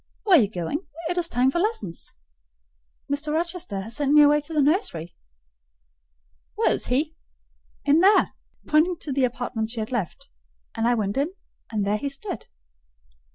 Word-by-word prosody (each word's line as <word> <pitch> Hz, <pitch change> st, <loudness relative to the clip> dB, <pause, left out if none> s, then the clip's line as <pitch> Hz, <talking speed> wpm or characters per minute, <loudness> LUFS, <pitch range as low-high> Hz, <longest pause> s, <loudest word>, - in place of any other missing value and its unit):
"Where 395 Hz, -4 st, +6 dB
are 310 Hz, -, +7 dB
you 205 Hz, -, +1 dB
going? 210 Hz, -, -4 dB, 0.2 s
It 355 Hz, -, -2 dB
is 340 Hz, -1 st, 0 dB
time 250 Hz, +2 st, +2 dB
for 345 Hz, -, 0 dB
lessons." 350 Hz, -, -3 dB, 0.9 s
"Mr. 290 Hz, +2 st, -2 dB
Rochester 330 Hz, -, -2 dB
has 220 Hz, +4 st, -6 dB
sent 290 Hz, -1 st, +1 dB
me 300 Hz, 0 st, +8 dB
away 295 Hz, +1 st, +5 dB
to 290 Hz, -, -8 dB
the 310 Hz, -, 0 dB
nursery." 275 Hz, -, 0 dB, 1.4 s
"Where -, -, +2 dB
is -, -, -1 dB
he?" 295 Hz, +5 st, 0 dB, 0.7 s
"In 295 Hz, +2 st, +5 dB
there," 390 Hz, +4 st, +5 dB, 0.3 s
pointing 325 Hz, +3 st, +3 dB
to 285 Hz, -, -3 dB
the 265 Hz, -1 st, +3 dB
apartment 240 Hz, -2 st, -3 dB
she 230 Hz, 0 st, -4 dB
had 215 Hz, +2 st, -4 dB
left; 220 Hz, -9 st, -3 dB, 0.5 s
and 225 Hz, +1 st, +1 dB
I 240 Hz, -, +3 dB
went 205 Hz, -1 st, -2 dB
in, 305 Hz, +7 st, -1 dB, 0.4 s
and 210 Hz, -3 st, -1 dB
there 205 Hz, +1 st, +1 dB
he 280 Hz, +6 st, -3 dB
stood. 275 Hz, -, -6 dB
280 Hz, 170 wpm, -24 LUFS, 225-320 Hz, 1.4 s, me